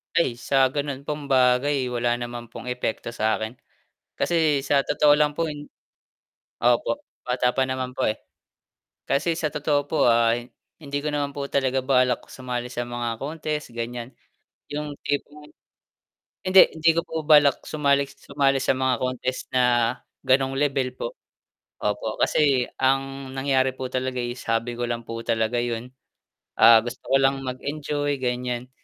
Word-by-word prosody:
Ay 150 -8 +2
sa 135 +2 +2
ganun 140 0 -4
pong 150 -1 -4
bagay, 130 +1 +3
wala 120 -1 0
naman 120 -1 -7
pong - - -9
epekto 125 -1 -3
sa 110 0 +1
akin. 110 +2 -5 0.6
Kasi 155 -5 +1
sa 140 0 +2
totoo 150 -1 +4
lang 150 -1 +2
po, 165 +1 -1
yung 145 0 -8 0.9
po, 120 - +2 0.2
bata 125 0 0
pa 135 - +2
naman 130 -1 -3
po 130 - -3
eh. 110 - -5 0.9
Kasi 160 +4 0
sa 160 - 0
totoo 145 -1 0
po 145 -4 +3
ah, 115 0 +4 0.5
hindi 145 -1 -3
ko 145 - -5
naman 145 -1 -1
po 140 0 -5
talaga 135 -1 0
balak 125 -2 +2
sumali 125 -2 -5
sa 120 0 -4
mga 120 -1 -3
contest 150 -1 -4
ganyan. 120 +1 -5 0.6
Yung 150 -1 -4
tipong 145 +1 -3 1.0
hindi, 185 0 +7
hindi 160 +1 +4
ko 170 - +1
po 160 -2 -5
balak 145 -3 +5
sumali 140 -2 +2
sumali 140 0 0
sa 135 - +2
mga 130 0 +2
contest 130 0 -2
na, 120 -2 +2 0.2
ganong 135 +1 +2
level 135 -3 0
po, 125 - -4 0.7
opo 105 +1 -2
kasi 135 -5 +3
ang 135 0 0
nangyari 135 -1 +1
po 130 0 -4
talaga 130 0 -2
is, 120 +1 -5
hobby 115 +1 0
ko 120 - 0
lang 120 0 -2
po 115 - -5
talaga 110 +1 0
yun, 120 0 -3 0.7
ah, 115 0 +8
gusto 120 +1 -7
ko 135 - +3
lang 135 0 +2
mag-enjoy 145 +2 -2
ganyan. 125 0 -2
130 Hz, 155 wpm, -24 LUFS, 120-145 Hz, 1.0 s, ah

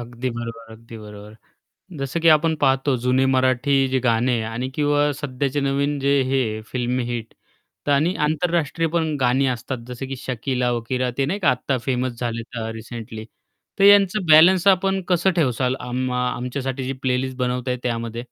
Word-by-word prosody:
अगदी 120 +1 -5
बरोबर, 115 -1 -7
अगदी 115 0 -12
बरोबर. 105 0 -11 0.6
जसं 135 +5 -3
की 165 - +4
आपण 160 +1 +4
पाहतो 135 -1 +2
जुने 130 +1 +3
मराठी 130 +1 +2
जे 130 0 +1
गाणे 120 0 +1
आणि 125 +3 -3
किंवा 145 0 +2
सध्याचे 140 0 -2
नवीन 140 +1 0
जे 140 0 +2
हे 115 -5 0
फिल्म 125 0 -2
हिट 115 -2 -5 0.5
तर - - +1
आणि 160 +6 +2
आंतरराष्ट्रीय 165 +1 0
पण 160 -2 -1
गाणी 130 +2 +2
असतात, 125 +1 -3
जसं 125 +2 -6
की 135 - -5
शकीला-वकीरा 125 0 -2
ते 135 - +2
नाही 190 +7 -2
का 145 - +4
आत्ता 125 +1 -1
फेमस 130 -1 -1
झाले 115 -1 -2
तर 115 -1 -4
रिसेंटली. 115 -1 -8 0.5
तर 195 - +4
यांचं 200 -1 +5
बॅलन्स 170 +4 +6
आपण 195 0 +3
कसं 180 +1 +3
ठेवाल 130 -4 +1
आम 125 +1 -3
आमच्यासाठी 125 +1 -3
जी 135 - -2
प्लेलिस्ट 130 0 -1
बनवताय 125 0 -1
त्यामध्ये? 115 -1 -3
130 Hz, 160 wpm, -22 LUFS, 120-145 Hz, 0.6 s, बॅलन्स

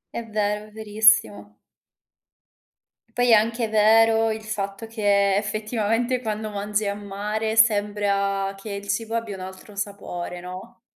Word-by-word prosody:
È 235 - -3
vero, 210 0 -1
è - - -18
verissimo. 210 - +2 1.6
Poi 245 0 +2
è - - +7
anche 225 +2 +3
vero, 225 +1 +4
il 220 0 -4
fatto 200 0 -4
che, 200 -3 +2
effetivamente 220 +4 -1
quando 215 -2 -4
mangi 205 0 -2
a 200 - -1
mare, 210 +2 -3
sembra 205 -2 +2
che 210 +1 -8
il 200 0 -6
cibo 225 +3 -2
abbia 225 -3 -2
un 185 - -9
altro 190 +2 -11
sapore 200 -3 -5
no, 185 +5 -10
210 Hz, 135 wpm, -24 LUFS, 200-220 Hz, 1.6 s, è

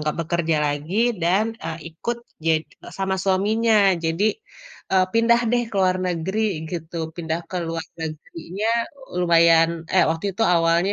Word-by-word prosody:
nggak 150 0 -1
bekerja 165 -1 0
lagi 145 +6 -3 0.3
dan, 185 +5 +3 0.2
eee, 165 0 -4
ikut 235 +9 -3 0.3
ja 165 - +4 0.5
sama 190 0 0
suaminya 215 +4 +2 0.3
jadi, 165 +5 0 0.7
eee, 185 -1 +5
pindah 235 +1 +4
deh 240 0 +2
ke - - -12
luar 185 -1 +3
negeri 180 +4 -2 0.3
gitu 170 -1 -6 0.2
pindah 165 -1 -2
ke 185 - -4
luar 165 0 -3 0.2
negerinya 165 +6 -5 0.5
lumayan, 165 -1 +5 0.3
eh, 185 - +6
waktu 165 +2 -3
itu 190 - -10
awalnya 170 +3 +2
170 Hz, 145 wpm, -22 LUFS, 165-195 Hz, 0.7 s, eh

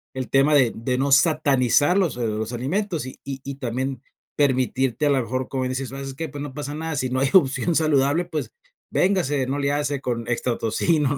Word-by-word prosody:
el 130 -1 -4
tema 135 +2 +4
de 130 -5 +5
de 125 +3 -2
no 140 +1 0
satanizar 145 +1 +3
los 185 -5 +1
los 110 -1 -2
alimentos 165 - -2
y 130 - -10
y 135 -1 -6
y 140 0 -5
también 130 0 -3 0.4
permitirte 130 -1 +1
a - - +3
lo 135 -2 +3
mejor, 130 +2 -3
como 130 -1 -2
dices, 130 +1 -3
¿sabes 135 0 -6
qué? 160 +4 -4
Pues 145 +1 -7
no 145 -2 -6
pasa 145 0 -5
nada, 160 0 -4
si 130 -2 -1
no 130 +1 -1
hay 135 - +2
opción 170 0 +3
saludable, 155 +1 +2
pues, 160 -3 -4 0.4
véngase, 150 -9 +1
no 140 +2 -2
le 140 0 +1
hace 145 -1 -1
con 120 -3 -3
extra 120 0 -1
tocino, 145 +5 +1
135 Hz, 205 wpm, -23 LUFS, 130-150 Hz, 0.4 s, de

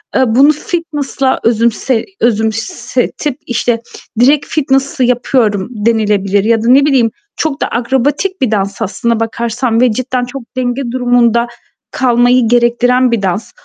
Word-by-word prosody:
Eee, 260 - +4
bunu 265 +6 +5
fitness'la 295 -4 -2
özümse 230 +1 +1
özümsetip, 235 +4 -1
işte, 240 -1 -1 0.4
direkt 285 +4 +4
fitness 270 -2 0
yapıyorum 240 -5 +1 0.2
denilebilir 205 -3 +1
ya 225 0 +1
da - - -1
ne 275 +3 +5
bileyim 255 -6 +2 0.2
çok 310 -3 -2
da - - +1
akrobatik 270 +10 -1
bir 255 -4 +1
dans 200 0 -2
aslında 225 +2 -1
bakarsan 230 +1 -1
ve 250 -2 +4
cidden 255 +2 -2
çok 265 +2 -8 0.2
denge 255 +1 -1
durumunda 245 -2 +2 0.4
kalmayı 245 -1 +2
gerektiren 245 +1 +2
bir 230 -3 0
dans. 190 +3 -2
245 Hz, 130 wpm, -13 LUFS, 225-265 Hz, 0.4 s, bunu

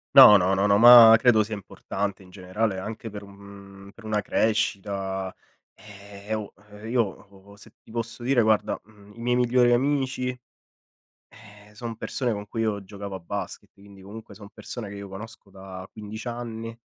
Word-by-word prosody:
No, 105 - +11
no, 95 0 +3
no, 100 +1 +1
no, 100 0 +4
ma 115 -1 +10
credo 115 -2 +4
sia 105 0 -3
importante 100 0 -5
in 90 -1 -17
generale, 95 +2 -3
anche 110 +3 -7
per 105 0 -9
un 100 0 -14
per 115 - -16
una 110 -1 -1
crescita. 95 -3 -2 0.4
Eh, 100 0 -10
oh, 110 -1 -4 0.3
io 120 +1 +1
o 100 0 -9
se 100 - -17
ti - - -18
posso 115 0 -5
dire, 125 0 +2
guarda, 110 -1 +1
mhmm, 105 -1 -19
i - - -15
miei 125 +1 +1
migliori 125 0 +3
amici, 130 0 0 1.0
eh, 105 -1 -18
son 115 0 -7
persone 125 +1 -3
con 105 -1 -5
cui 115 - -4
io 105 -3 -1
giocavo 100 0 -9
a - - -7
basket, 100 +3 -7
quindi 100 -1 -17
comunque 105 +3 -11
son 105 -2 -12
persone 120 -4 -8
che 100 - -9
io 100 -1 -9
conosco 105 +1 -11
da 95 -1 -10
15 110 +1 -9
anni 115 -1 -6
105 Hz, 175 wpm, -25 LUFS, 100-115 Hz, 1.0 s, No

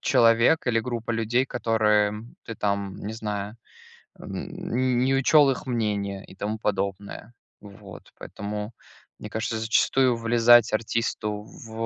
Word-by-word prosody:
человек 115 +7 +3
или 115 -2 +2
группа 120 -1 -4
людей, 115 +3 0
которым 110 -1 0
ты 115 - -7
там, 100 -2 -2
не 105 +2 -6
знаю, 105 -1 -5 0.6
м, - - -7
не 130 0 +1
не 130 +2 +2
учёл 140 +1 +5
их 125 - -5
мнение 105 -5 -2
и - - -15
тому 105 +2 -3
подобное. 100 +2 -4 0.3
Вот, 100 -2 -13
поэтому, 105 +2 -6 0.5
мне - - -8
кажется, 110 +1 -3
зачастую 120 +2 +2
влезать 115 0 +5
артисту 105 -1 -2
в, 110 +1 -13
110 Hz, 130 wpm, -25 LUFS, 105-120 Hz, 0.6 s, учёл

